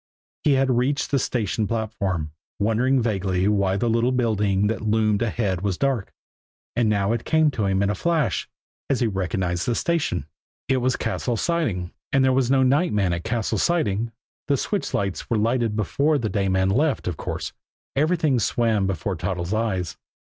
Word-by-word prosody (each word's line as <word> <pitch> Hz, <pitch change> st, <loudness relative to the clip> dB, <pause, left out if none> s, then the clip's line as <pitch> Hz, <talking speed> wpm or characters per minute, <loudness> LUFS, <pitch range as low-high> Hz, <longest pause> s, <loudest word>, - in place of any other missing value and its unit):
He 150 Hz, -, +4 dB
had 135 Hz, 0 st, +2 dB
reached 130 Hz, +4 st, 0 dB
the 140 Hz, -, +3 dB
station 110 Hz, -3 st, -1 dB
platform, 100 Hz, -7 st, -2 dB, 0.3 s
wondering 120 Hz, +6 st, +2 dB
vaguely 95 Hz, -4 st, 0 dB
why 100 Hz, -2 st, +2 dB
the 120 Hz, -, 0 dB
little 115 Hz, +2 st, +2 dB
building 105 Hz, -5 st, +1 dB
that 110 Hz, +1 st, -1 dB
loomed 110 Hz, -1 st, +1 dB
ahead 105 Hz, -5 st, -1 dB
was 100 Hz, -2 st, -1 dB
dark 135 Hz, -7 st, 0 dB, 0.6 s
and 115 Hz, -2 st, +2 dB
now 100 Hz, -1 st, +1 dB
it 115 Hz, -, -2 dB
came 160 Hz, -1 st, +3 dB
to 110 Hz, -6 st, -1 dB
him 95 Hz, 0 st, +1 dB
in 100 Hz, -, +1 dB
a -, -, 0 dB
flash, 165 Hz, -, 0 dB, 0.4 s
as 135 Hz, -2 st, +1 dB
he -, -, +3 dB
recognized 95 Hz, -3 st, -1 dB
the 120 Hz, -, +1 dB
station. 150 Hz, -, 0 dB, 0.4 s
It 130 Hz, -, +2 dB
was 130 Hz, +1 st, +1 dB
Cassil's 120 Hz, -3 st, -2 dB
Siding 115 Hz, -, -1 dB, 0.2 s
and 135 Hz, -2 st, +4 dB
there 130 Hz, -, +3 dB
was 130 Hz, -2 st, +2 dB
no 135 Hz, -1 st, +4 dB
night 140 Hz, +6 st, +2 dB
man 95 Hz, -4 st, +1 dB
at 85 Hz, 0 st, -3 dB
Cassil's 110 Hz, -2 st, -1 dB
Siding! 115 Hz, -, +1 dB, 0.4 s
The 140 Hz, -, +2 dB
switch 205 Hz, +9 st, -2 dB
lights 100 Hz, -2 st, -2 dB
were 115 Hz, -, +2 dB
lighted 115 Hz, 0 st, +1 dB
before 140 Hz, +8 st, +1 dB
the 115 Hz, -5 st, -2 dB
day 100 Hz, -3 st, 0 dB
man 95 Hz, 0 st, +2 dB
left, 140 Hz, +5 st, +1 dB
of 90 Hz, -, -1 dB
course. -, -, -5 dB, 0.4 s
Everything 155 Hz, -2 st, +2 dB
swam 110 Hz, -2 st, +1 dB
before 95 Hz, +1 st, -2 dB
Toddles' 90 Hz, +2 st, -3 dB
eyes. 95 Hz, -6 st, -1 dB
110 Hz, 180 wpm, -24 LUFS, 95-130 Hz, 0.6 s, He